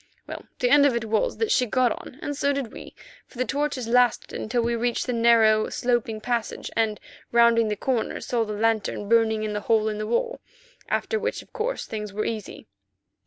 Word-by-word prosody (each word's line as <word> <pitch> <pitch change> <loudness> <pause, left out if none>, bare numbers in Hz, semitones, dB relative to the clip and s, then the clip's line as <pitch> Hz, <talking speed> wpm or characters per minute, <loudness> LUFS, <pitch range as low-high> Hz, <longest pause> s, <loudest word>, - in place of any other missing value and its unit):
Well, - - -8
the 245 -2 +1
end 285 0 +7
of 260 - +1
it 235 -1 -2
was 225 - 0
that 450 - 0
she 250 - +3
got 250 +1 +2
on, 250 - -7
and 290 - -3
so 280 0 +1
did 275 -5 -3
we, - - -11 0.3
for - - -17
the 255 - 0
torches 285 -3 -2
lasted 245 0 +2
until 235 +2 -1
we 235 0 0
reached 235 +1 -1
the 250 - -2
narrow, 225 -2 +4
sloping 240 -3 -1
passage, 235 0 -3
and, 220 -2 0 0.3
rounding 235 -1 +5
the 210 - -1
corner, 245 +1 -1
saw 235 -2 -1
the 210 -1 -4
lantern 215 -1 0
burning 220 -1 +3
in 215 -1 -2
the 210 - -2
hole 220 0 +2
in 210 -1 -4
the 215 - -3
wall, 475 - -1 0.5
after 445 - 0
which, 470 +3 -3
of - - -28
course, 485 +2 -2
things 210 -2 -6
were 215 +1 -2
easy. 220 -3 -5
235 Hz, 210 wpm, -25 LUFS, 220-255 Hz, 0.5 s, end